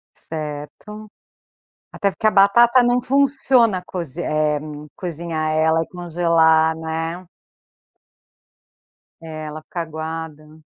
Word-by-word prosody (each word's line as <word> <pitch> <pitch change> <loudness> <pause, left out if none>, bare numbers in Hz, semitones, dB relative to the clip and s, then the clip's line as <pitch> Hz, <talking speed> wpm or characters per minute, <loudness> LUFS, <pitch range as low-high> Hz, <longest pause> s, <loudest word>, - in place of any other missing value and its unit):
Certo. 160 +8 -8 0.8
Até 200 - 0
porque 220 - 0
a - - +4
batata 235 +5 +5
não 245 +1 +2
funciona 265 -7 +2
cozi 170 -2 -6
eh, 150 -2 0 0.4
cozinhar 165 -3 -3
ela 160 +1 +2
e - - -5
congelar, 165 -2 +2
né. 165 +2 -4 2.0
É 165 - -11 0.2
ela 155 +1 -7
ficar 170 +2 -6
aguada. 160 -1 -7
165 Hz, 100 wpm, -20 LUFS, 155-200 Hz, 2.0 s, batata